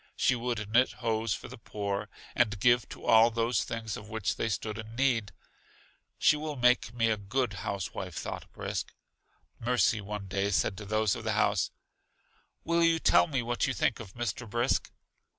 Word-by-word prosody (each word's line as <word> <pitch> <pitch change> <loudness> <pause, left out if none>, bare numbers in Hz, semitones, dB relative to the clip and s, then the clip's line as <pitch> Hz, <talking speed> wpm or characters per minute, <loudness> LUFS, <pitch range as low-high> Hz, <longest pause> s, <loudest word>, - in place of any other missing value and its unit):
She - - +3
would 120 -3 -2
knit 125 +3 +4
hose 110 -2 -1
for - - -9
the - - -11
poor, 100 -1 -3 0.2
and 110 -4 +1
give 120 +1 +3
to - - -10
all 115 +1 +7
those 115 +1 0
things 115 -2 -4
of 105 - -9
which 105 -8 -1
they 115 - -1
stood 110 0 -3
in 110 +1 -8
need. 120 -6 +1 0.9
She - - +5
will 150 0 -4
make 125 -3 +3
me 115 -1 +1
a 110 - +1
good 110 +3 -1
house 100 -3 -3
wife, - - -6
thought - - -6
Brisk. - - -4 0.6
Mercy 115 -2 +2
one 105 0 -5
day 95 +1 -1
said 95 -1 +1
to 105 - -7
those 110 0 +1
of - - -7
the - - 0
house: - - +2 0.9
Will 170 +1 +2
you 165 0 +4
tell 160 - +4
me 135 -6 -1
what 120 +1 0
you 130 - -1
think 120 - +1
of 105 -5 -10
Mr. 120 0 -3
Brisk? 120 +4 0
115 Hz, 185 wpm, -30 LUFS, 105-125 Hz, 0.9 s, all